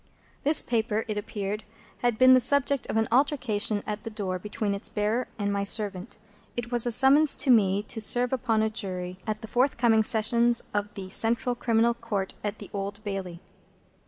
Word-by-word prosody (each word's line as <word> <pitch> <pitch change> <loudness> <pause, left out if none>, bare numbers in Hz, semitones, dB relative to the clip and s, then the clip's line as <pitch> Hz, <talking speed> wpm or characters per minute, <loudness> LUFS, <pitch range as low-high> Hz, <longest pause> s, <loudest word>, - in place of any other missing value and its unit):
This 300 +2 +4
paper, 225 -2 -1
it 215 - -3
appeared, 210 0 -4 0.4
had 240 -2 0
been 255 +1 +7
the 255 - +6
subject 280 0 +2
of - - -1
an 220 -1 +1
altercation 235 -6 +1
at 210 0 -4
the - - -7
door 195 -4 -4
between 210 +1 -3
its 200 - -6
bearer 215 +4 -1
and 205 -1 -2
my 200 0 -1
servant. 200 -2 -2 0.4
It 240 0 -4
was 240 -1 +2
a - - 0
summons 275 +5 +5
to 260 0 +2
me 200 -3 +3
to 225 +1 -5
serve 245 +4 +3
upon 225 -4 0
a 220 - +1
Jury 185 -4 -5
at 215 0 -3
the - - -6
forthcoming 240 -2 +2
Sessions 235 +2 +2
of 205 0 -2
the 190 -1 -8
Central 235 +4 +1
Criminal 235 -1 +1
Court 225 -5 -4
at 210 0 -3
the 205 - -11
Old 200 0 -5
Bailey. 190 -4 -5
220 Hz, 190 wpm, -26 LUFS, 205-240 Hz, 0.4 s, been